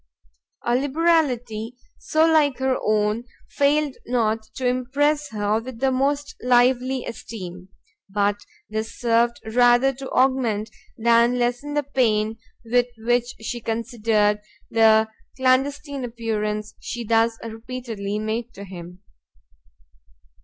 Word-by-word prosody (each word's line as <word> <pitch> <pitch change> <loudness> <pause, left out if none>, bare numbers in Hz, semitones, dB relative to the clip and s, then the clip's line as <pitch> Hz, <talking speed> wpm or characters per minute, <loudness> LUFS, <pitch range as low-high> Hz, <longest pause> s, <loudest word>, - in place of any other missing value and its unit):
A 240 - +2
liberality 255 -6 +1 0.2
so 315 +1 +2
like 305 -4 +3
her 265 0 +1
own 215 +2 +1 0.3
failed 285 -1 +2
not 225 -2 +1
to 260 - -4
impress 280 +4 +1
her 210 0 0
with 245 -1 -9
the 265 +1 +2
most 280 +2 0
lively 250 +1 +3
esteem: 185 -5 -8 0.4
but 205 +1 +1 0.3
this 220 +1 -5
served 235 0 +2
rather 245 +2 +5
to 265 +1 -8
augment 240 -5 +1 0.3
than 235 +2 +4
lessen 245 +4 -1
the 295 - +1
pain 225 -5 +1 0.3
with 245 +1 +2
which 240 +2 0
she 240 +2 -4
considered 225 -2 +1 0.3
the 220 -1 +5 0.3
clandestine 275 +2 +1
appearance 215 -3 -3
she 240 - -5
thus 225 0 +2
repeatedly 225 -3 -5
made 220 +3 -3
to 200 - -8
him. 180 0 -10
240 Hz, 115 wpm, -23 LUFS, 220-260 Hz, 0.4 s, rather